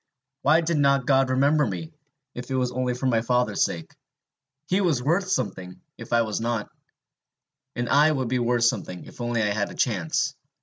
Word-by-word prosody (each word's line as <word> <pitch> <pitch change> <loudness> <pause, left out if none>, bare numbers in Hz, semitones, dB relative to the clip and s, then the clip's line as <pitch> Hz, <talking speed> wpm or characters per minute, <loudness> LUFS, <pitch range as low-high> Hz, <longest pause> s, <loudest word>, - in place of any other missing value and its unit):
Why 155 +4 +4
did 165 -2 0
not 140 -2 +3
God 135 -1 +3
remember 140 +4 +3
me, 110 - -5 0.4
if 125 +1 -8
it 135 - -1
was 125 -1 0
only 125 0 -1
for 125 - -5
my 115 -3 +2
father's 125 -3 +1
sake? 85 -1 -4 0.7
He 185 +6 +1
was 155 -10 +1
worth 180 +7 +1
something, 90 - -3 0.2
if - - -11
I 115 0 +4
was 110 -1 -3
not! 115 -2 -2 1.0
And 120 0 -2
I 150 +4 +5
would 130 -5 -1
be 125 +1 0
worth 120 0 +1
something, 90 -6 -1
if - - -12
only 120 -1 0
I 105 - +1
had 100 0 -1
a - - -10
chance! 140 - 0
125 Hz, 190 wpm, -25 LUFS, 115-145 Hz, 1.0 s, I